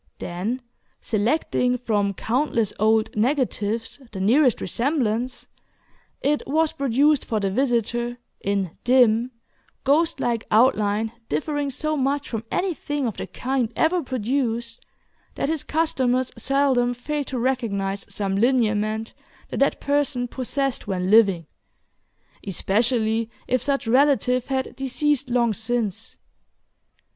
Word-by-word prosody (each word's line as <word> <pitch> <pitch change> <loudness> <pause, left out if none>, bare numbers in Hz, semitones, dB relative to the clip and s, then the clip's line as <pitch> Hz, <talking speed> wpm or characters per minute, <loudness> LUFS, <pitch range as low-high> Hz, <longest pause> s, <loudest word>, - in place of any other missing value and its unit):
Then, 210 +9 -4 0.4
selecting 250 +2 0
from 205 -5 0
countless 230 -3 0
old 220 +1 +2
"negatives" 230 -2 -1
the 195 - -6
nearest 245 +5 +3
resemblance, 245 - -1 0.8
it 295 +1 +1
was 315 +3 +2
produced 280 +2 +2
for 220 - -1
the 195 -1 -1
visitor, 240 0 0 0.2
in 195 -3 -2
dim, 245 -1 +4 0.5
ghostlike 280 -5 +1
outline 215 -2 +3 0.2
differing 285 - -1
so 310 +3 -1
much 280 +1 0
from 225 -2 -4
anything 295 -6 -2
of 225 - -3
the - - -5
kind 255 -3 -2
ever 345 +2 +2
produced, 240 -2 -2 0.5
that - - -1
his 320 -2 -1
customers 260 -6 0
seldom 265 -3 +1
failed 290 +3 -3
to 260 - -3
recognize 205 -6 -1
some 195 -2 -2
lineament 220 -1 +1 0.4
the - - -4
dead 275 - +2
person 285 -3 0
possessed 265 0 -2
when 185 -1 -1
living, 195 -7 +5 1.0
especially 220 +3 +1 0.2
if 255 -1 +1
such 275 0 0
relative 255 0 +3
had 265 -1 -2
deceased 270 +1 0
long 240 -2 +2
since. 225 -2 -3
245 Hz, 115 wpm, -23 LUFS, 220-275 Hz, 1.0 s, living